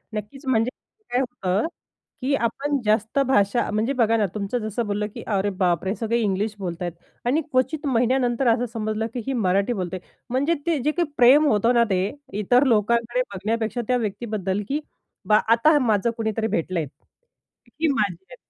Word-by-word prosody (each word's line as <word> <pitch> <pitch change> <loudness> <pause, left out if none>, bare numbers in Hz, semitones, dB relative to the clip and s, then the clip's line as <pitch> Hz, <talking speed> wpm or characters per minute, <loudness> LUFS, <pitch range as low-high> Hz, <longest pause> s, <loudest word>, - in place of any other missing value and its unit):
नक्कीच 215 +8 -7
म्हणजे 230 -2 +2 0.4
काय 245 - +2
होतं, 235 - -1 0.5
की 275 +2 0
आपण 275 +4 -1
जास्त 220 +4 +1
भाषा 205 -1 +2
म्हणजे 220 +6 0
बघा 230 -3 +2
ना 210 - +2
तुमचं 210 +3 -2
जसं 215 +2 -3
बोललं, 205 +1 -1
की - - -7
अरे 200 +1 +1
बापरे! 180 +1 +1
सगळे 230 +1 -1
इंग्लिश 210 0 -1
बोलतायेत. 175 -1 -4 0.3
आणि 275 +7 +2
क्वचित 290 +4 0
महिन्यानंतर 250 0 +1
असं 245 +1 -1
समजलं, 215 0 -2
की 250 - -3
ही 270 - 0
मराठी 200 0 +1
बोलते. 185 -2 -4 0.3
म्हणजे 280 +7 +1
ते 330 -3 +2
जे 300 - +2
काही 345 0 0
प्रेम 270 +5 +7
होतं 230 0 +3
ना 235 -1 +5
ते 185 -1 +2 0.4
इतर 245 +6 +4
लोकांकडे 235 +2 +2
बघण्यापेक्षा 220 +4 -2
त्या 250 - +2
व्यक्तीबद्दल, 210 -3 -2
की 290 +2 0 0.5
बा 210 0 +5
आता 295 +7 +4
माझं 230 -2 +2
कुणीतरी 220 0 -1
भेटलं 175 -2 -1
आहे. 150 - -2 0.9
ही 325 - +4
माझी 200 - 0
आहे. - - -9
225 Hz, 170 wpm, -23 LUFS, 205-250 Hz, 0.9 s, प्रेम